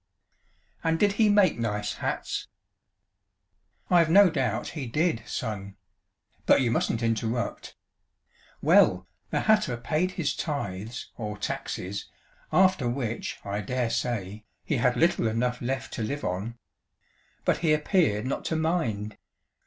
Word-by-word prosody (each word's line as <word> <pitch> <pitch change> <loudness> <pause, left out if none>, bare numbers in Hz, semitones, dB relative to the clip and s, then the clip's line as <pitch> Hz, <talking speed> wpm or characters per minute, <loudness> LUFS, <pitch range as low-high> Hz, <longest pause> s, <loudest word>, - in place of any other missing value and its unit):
"And 165 0 +2
did 205 +3 +3
he 210 +1 +3
make 205 - +4
nice 105 -2 -1
hats?" - - -3 1.4
"I've 170 -3 +5
no 195 +1 +7
doubt 125 -8 -1
he 145 -6 -5
did, 150 0 +1
Son. 100 -3 -4 0.7
But - - +6
you 120 -3 +1
mustn't 115 0 0
interrupt. 115 +1 -2 0.9
Well, - - +5 0.2
the - - 0
hatter 215 - +3
paid 155 +10 -1
his 150 -6 -1
tithes, 115 - -4
or 105 -2 -4
taxes, 100 -1 -4 0.4
after 185 -9 +4
which, 120 -2 -3
I 100 +1 -2
dare 120 +2 -1
say, 105 -3 -2 0.2
he - - -1
had - - +2
little - - +3
enough 125 +3 -1
left 130 +2 -3
to - - -4
live 145 +7 -3
on. 100 +6 -3 0.9
But - - +2
he 165 -2 +2
appeared 150 - +2
not 130 - -2
to 160 - -1
mind. 140 - -1
125 Hz, 130 wpm, -27 LUFS, 110-160 Hz, 1.4 s, no